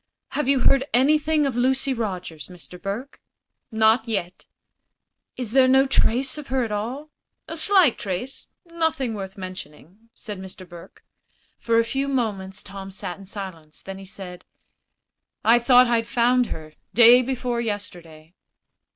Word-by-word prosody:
"Have 295 - -2
you 275 -2 +3
heard 275 +1 +4
anything 300 +3 +3
of 270 -4 -1
Lucy 265 +2 +1
Rogers, 185 -9 -5
Mr. 180 0 -12
Burke?" 220 +8 -6 0.5
"Not 220 +1 +3
yet." 190 -5 -3 0.9
"Is 245 -4 -4
there 260 +1 +5
no 265 +1 +5
trace 265 +1 +1
of 290 - -9
her 260 0 0
at 225 - -4
all?" 250 +9 -4 0.4
"A 325 - -6
slight 350 - +4
trace 200 +8 -4 0.2
nothing 320 -7 -1
worth 195 -1 -7
mentioning," 185 +2 -10
said 210 -4 -8
Mr. 185 -1 -10
Burke. 170 -1 -14 0.6
For 230 -1 +1
a 230 - +5
few 270 +4 -2
moments 205 -8 -2
Tom 195 -1 -8
sat 190 -1 -7
in 195 - -12
silence. 185 -6 -8
Then 195 0 -8
he 195 - -10
said: 185 -2 -9 1.0
"I 235 +2 +6
thought 250 +1 +6
I'd 230 -1 +1
found 245 +1 +2
her, 155 -1 -8 0.2
day 240 +1 +8
before 250 -2 -2
yesterday." 175 -7 -7
230 Hz, 150 wpm, -23 LUFS, 190-260 Hz, 1.0 s, day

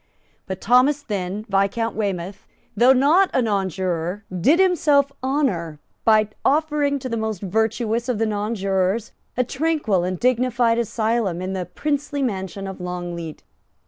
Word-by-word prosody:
But 190 -1 -5
Thomas 260 +6 +3
Thynne, 200 -1 -4
Viscount 200 +3 0
Weymouth, 195 -2 -3 0.3
though 240 +5 +6
not 300 +9 +4
a - - +4
nonjuror, 190 -2 -2
did 275 - +3
himself 305 -7 +3
honour 250 - -1 0.3
by 215 -1 +4
offering 295 -1 +1
to 260 - -6
the 230 - -2
most 220 -3 -3
virtuous 225 +4 0
of 245 - 0
the 225 - +1
nonjurors 205 -1 -1 0.3
a 250 - +3
tranquil 270 - 0
and 180 -1 -2
dignified 245 -1 +2
asylum 220 -5 0
in 185 +1 -4
the 185 -3 -3
princely 285 +5 -2
mansion 195 -4 -3
of 190 -1 -7
Longleat. 175 -3 -5
220 Hz, 140 wpm, -22 LUFS, 190-260 Hz, 0.3 s, though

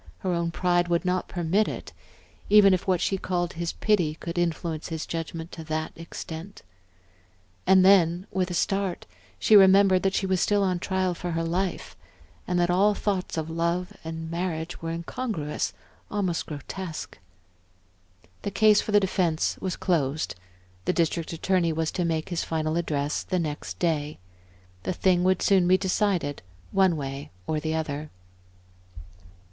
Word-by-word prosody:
Her 185 -2 0
own 170 0 0
pride 175 0 +1
would 170 +1 0
not 180 0 0
permit 180 +4 +1
it, - - -6 0.6
even 205 -2 +7
if 185 - -1
what 185 -2 +2
she 195 - 0
called 175 -2 -1
his 170 0 -3
pity 175 -8 +1
could 170 +1 -6
influence 165 -2 -1
his 160 -2 -4
judgment 165 0 -5
to 165 - -8
that 155 0 -2
extent. 165 +2 -8 1.0
And 190 -1 +6
then, 180 -2 +5
with 185 -1 0
a 175 - -3
start, 195 0 -1 0.3
she 215 - +4
remembered 195 -1 +7
that 195 0 +1
she 195 - +1
was 185 -1 +1
still 205 -1 +2
on 185 -2 0
trial 190 0 0
for 175 +1 -5
her 165 0 -1
life, 175 - -2 0.5
and 180 0 +1
that 175 0 +2
all 200 +3 +4
thoughts 190 -5 -2
of 160 0 -3
love 170 +2 -1
and 160 0 -6
marriage 170 -1 -3
were 165 - -3
incongruous, 165 -1 -3 0.4
almost 190 -5 -1
grotesque. 160 +3 -6 1.2
The - - -2
case 210 +1 +5
for - - -4
the 205 - +6
defense 180 -4 0
was 185 -2 -2
closed, 155 -5 0 0.5
the - - +2
District 165 -1 0
Attorney 170 0 +1
was 160 0 -1
to 180 - -1
make 160 0 -1
his 175 -2 -1
final 155 -1 -1
address 150 -4 -1
the 185 - -2
next 145 - -4
day. 150 - -1 0.6
The 185 - -2
thing 180 0 +2
would 185 0 +2
soon 190 -3 +4
be 185 +1 +5
decided, 185 -6 0 0.3
one 190 -4 +3
way 135 0 -5 0.2
or 155 - -1
the 155 +1 -2
other. 150 -1 -3
175 Hz, 160 wpm, -26 LUFS, 160-190 Hz, 1.2 s, even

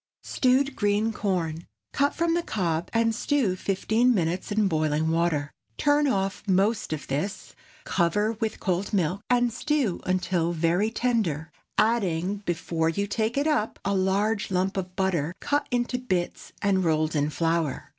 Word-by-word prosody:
STEWED 265 +2 +2
GREEN 205 +2 +1
CORN. 170 -6 -2 0.3
Cut 285 +1 +1
from 335 0 +1
the 345 - +1
cob, 175 - -2
and 230 0 +2
stew 240 -5 +1
fifteen 220 +6 +1
minutes 180 +1 -1
in 210 -1 +2
boiling 155 -1 +1
water. 165 -3 0 0.3
Turn 290 0 +3
off 195 -6 0
most 195 +2 +1
of 155 -2 -3
this, 155 +10 -3 0.3
cover 205 +5 +1
with 220 -1 -3
cold 185 +1 -1
milk, 185 0 +1
and 245 -1 +3
stew 265 - 0
until 180 -2 0
very 170 +6 +1
tender, 210 - -1 0.3
adding, 200 -4 +1
before 165 -1 0
you 200 +5 -1
take 220 +4 -1
it 285 - +2
up, 300 -9 0
a 200 - +1
large 200 +3 +1
lump 190 +1 0
of 185 -1 -4
butter 185 -4 0
cut 290 0 0
into 245 0 0
bits 185 -9 -3
and 195 -2 +2
rolled 155 -1 +1
in 145 0 +1
flour. 165 -2 -1
195 Hz, 155 wpm, -26 LUFS, 170-225 Hz, 0.3 s, Turn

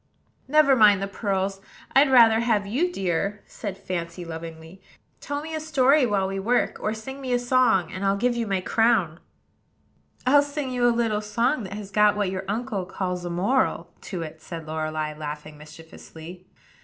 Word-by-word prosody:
"Never 290 -1 +5
mind 210 -4 +6
the 195 - -2
pearls: 195 -1 -2 0.3
I'd 275 +1 +6
rather 230 -4 +6
have 225 -4 +1
you, 280 - 0
dear," 195 - -2
said 200 -4 -7
Fancy 175 -1 -5
lovingly. 165 +2 -9 0.4
"Tell 285 0 -4
me 320 0 -7
a 315 - -2
story 285 -3 +3
while 195 -3 0
we 195 0 -3
work, 240 +5 0
or 215 +1 -2
sing 265 +5 -8
me 255 -2 -2
a - - +4
song; 245 -8 +2
and 185 - -6
I'll 195 0 +2
give 240 +3 +1
you 235 -1 -2
my 195 -2 0
crown." 195 -6 +1 1.1
"I'll 285 +3 +6
sing 285 -2 -4
you 245 -1 +2
a - - +5
little 230 -3 0
song 235 +6 0
that 190 - -7
has 205 -1 -8
got 210 0 +4
what 200 -3 0
your 190 0 -4
uncle 210 -3 -3
calls 180 -2 -4
a - - -3
moral 175 -2 0 0.2
to 180 -5 -4
it," 160 0 -9
said 165 -1 -8
Lorelei, 155 -1 -3
laughing 150 0 -7
mischievously. 160 +3 -12
200 Hz, 180 wpm, -24 LUFS, 175-245 Hz, 1.1 s, mind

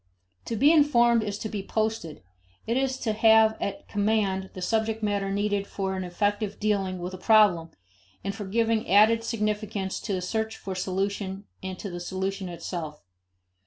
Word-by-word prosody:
To 230 - -3
be 280 +8 +5
informed 240 -7 +5
is 205 -2 -3
to 220 - -4
be 210 -2 -4
posted; 215 - -2 0.4
it 230 - -1
is 265 0 0
to 220 - 0
have 220 0 +5
at 200 - -4
command 200 -2 0
the - - -6
subject 220 +2 0
matter 200 -2 0
needed 205 0 0
for 190 -1 -3
an 185 - -3
effective 205 +3 -1
dealing 195 -3 0
with 180 +1 -5
a 185 - -7
problem, 200 -7 +4 0.5
and 195 +1 -2
for 205 0 -6
giving 225 +2 0
added 220 +4 +5
significance 210 -3 -2
to 205 - -4
the 185 - -1
search 220 +3 -2
for 195 - -6
solution 195 +1 -2 0.2
and 190 -1 -5
to 200 - -6
the 175 - -5
solution 190 +1 -3
itself. 170 -3 -6
205 Hz, 170 wpm, -26 LUFS, 190-220 Hz, 0.5 s, be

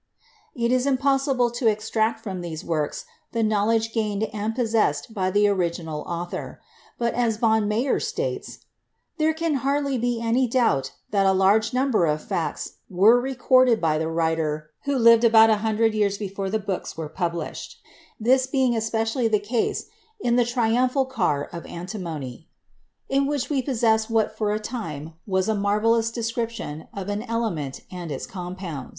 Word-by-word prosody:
It 235 0 0
is 255 +1 +2
impossible 270 -2 +2
to 240 0 -1
extract 220 +1 0
from 190 -4 -4
these 170 -1 -6
works 155 -3 -2 0.3
the 230 -1 +1
knowledge 220 +1 +1
gained 210 -2 -1
and 215 +1 -2
possessed 220 - 0
by 185 -3 0
the 205 +2 +3
original 170 -5 -1
author, 175 0 -5 0.4
but, 235 -1 0
as 230 -3 +1
von 220 -2 +2
Meyer 235 +6 +1
states, - - -4 0.5
"there 310 +1 +3
can 320 -3 0
hardly 280 -1 0
be 240 0 0
any 230 +3 +1
doubt 225 - +1 0.2
that 195 -2 +3
a - - +5
large 205 +4 +3
number 255 -8 +2
of 150 0 -1
facts - - -3
were 210 +6 +5
recorded 255 -2 +3
by 155 -3 +1
the 160 - -1
writer 160 -2 -1
who 280 0 0
lived 230 -1 +6
about 225 -1 +7
a 215 - +3
hundred 220 +1 +1
years 205 -2 +1
before 195 -1 -4
the 220 - +1
books 195 -5 -4
were 160 -1 -4
published, 170 -1 -4 0.4
this 255 +3 +3
being 260 -2 +1
especially 225 +2 0
the 215 -1 +3
case 220 +3 -1 0.3
in 240 -11 +1
the 245 -1 +4
'Triumphal 250 +3 +1
Car 180 - -1
of 170 - -6
Antimony,' 170 - -6 0.6
in 275 0 +1
which 285 -2 -2
we 275 -2 +2
possess 225 -4 +1
what 220 -1 +1
for 215 -1 0
a 210 - 0
time 165 - -6
was 190 0 +1
a 220 - +2
marvelous 215 +3 +2
description 230 -9 -4
of 195 -1 -6
an 205 +1 -2
element 220 - -3
and 175 -3 -6
its 135 - -4
compounds." 180 -6 -6
220 Hz, 165 wpm, -24 LUFS, 185-240 Hz, 0.6 s, about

